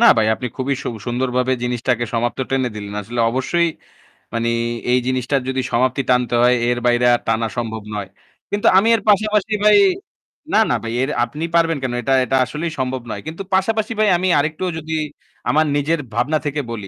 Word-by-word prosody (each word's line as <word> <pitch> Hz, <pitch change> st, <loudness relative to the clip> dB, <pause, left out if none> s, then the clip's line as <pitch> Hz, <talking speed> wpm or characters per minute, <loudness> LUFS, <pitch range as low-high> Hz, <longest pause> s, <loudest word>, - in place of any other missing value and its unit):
না 235 Hz, -, +7 dB
ভাই 110 Hz, -1 st, +3 dB
আপনি 125 Hz, -, -5 dB
খুবই 135 Hz, +1 st, -1 dB
সু -, -, -3 dB, 0.2 s
সুন্দরভাবে 125 Hz, +1 st, 0 dB
জিনিসটাকে 125 Hz, -1 st, 0 dB
সমাপ্ত 120 Hz, +2 st, -1 dB
টেনে 130 Hz, -2 st, +1 dB
দিলেন। 100 Hz, -1 st, -7 dB
আসলে 120 Hz, +4 st, -3 dB
অবশ্যই 170 Hz, +8 st, +1 dB, 0.7 s
মানে 115 Hz, 0 st, 0 dB, 0.4 s
এই 125 Hz, -, +4 dB
জিনিসটার 130 Hz, +1 st, 0 dB
যদি 130 Hz, 0 st, -1 dB
সমাপ্তি 130 Hz, +2 st, +1 dB
টানতে 125 Hz, -1 st, +2 dB
হয় 125 Hz, +1 st, +5 dB
এর 120 Hz, -, +1 dB
বাইরে 120 Hz, 0 st, +3 dB
আর 120 Hz, -, +2 dB
টানা 115 Hz, 0 st, +1 dB
সম্ভব 110 Hz, -2 st, -3 dB
নয়। 100 Hz, -2 st, -4 dB, 0.4 s
কিন্তু 205 Hz, 0 st, +1 dB
আমি 200 Hz, +4 st, +4 dB
এর 225 Hz, -, -2 dB
পাশাপাশি 210 Hz, 0 st, +2 dB
ভাই, 210 Hz, -, +7 dB, 0.8 s
না, -, -, +5 dB
না -, -, +2 dB
ভাই 115 Hz, 0 st, -4 dB
এর 135 Hz, -, 0 dB
আপনি 150 Hz, +2 st, -5 dB
পারবেন 165 Hz, -1 st, +3 dB
কেন? 130 Hz, -2 st, -2 dB
এটা 135 Hz, +3 st, 0 dB
এটা 130 Hz, +2 st, +1 dB
আসলেই 160 Hz, +5 st, -4 dB
সম্ভব 130 Hz, 0 st, -2 dB
নয়। -, -, -5 dB
কিন্তু 160 Hz, +4 st, -6 dB
পাশাপাশি 215 Hz, +4 st, +1 dB
ভাই 215 Hz, -1 st, +4 dB
আমি 185 Hz, +2 st, -1 dB
আরেকটু 155 Hz, +4 st, -2 dB
যদি 160 Hz, 0 st, -5 dB, 0.6 s
আমার 155 Hz, +1 st, +3 dB
নিজের 150 Hz, +3 st, +1 dB
ভাবনা 125 Hz, +7 st, +1 dB
থেকে 145 Hz, 0 st, -1 dB
বলি। 105 Hz, -4 st, -6 dB
130 Hz, 190 wpm, -19 LUFS, 120-160 Hz, 0.8 s, না